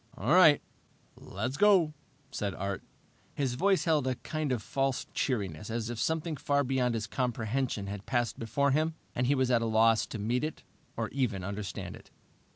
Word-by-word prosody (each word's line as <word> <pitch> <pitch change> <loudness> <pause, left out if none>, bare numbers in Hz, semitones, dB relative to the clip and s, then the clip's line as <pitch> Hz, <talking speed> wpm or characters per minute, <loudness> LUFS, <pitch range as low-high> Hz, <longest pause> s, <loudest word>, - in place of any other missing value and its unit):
"All - - +1
right, 160 -5 +7 0.5
let's 130 +2 -4
go," 190 -7 +5 0.4
said 100 -2 -3
Art. 100 0 -3 0.5
His 135 -4 0
voice 190 +9 +2
held 155 -5 +2
a 130 - +1
kind 155 +2 -3
of 120 -4 -1
false 135 -2 -1
cheeriness, 100 - -2
as 115 0 -2
if 120 - -5
something 160 -1 -1
far 145 0 +1
beyond 125 -2 +1
his 110 -2 -2
comprehension 120 -1 -1
had 100 0 -7
passed 120 -4 0
before 135 +5 +1
him 155 +3 +1 0.2
and 125 - 0
he 140 - +3
was 130 -1 +1
at 120 -1 +4
a - - 0
loss 110 -1 +3
to - - -6
meet 115 +5 0
it 155 0 -4 0.3
or - - -1
even 120 -9 -1
understand 100 -2 -5
it. - - -15
125 Hz, 180 wpm, -30 LUFS, 110-145 Hz, 0.5 s, right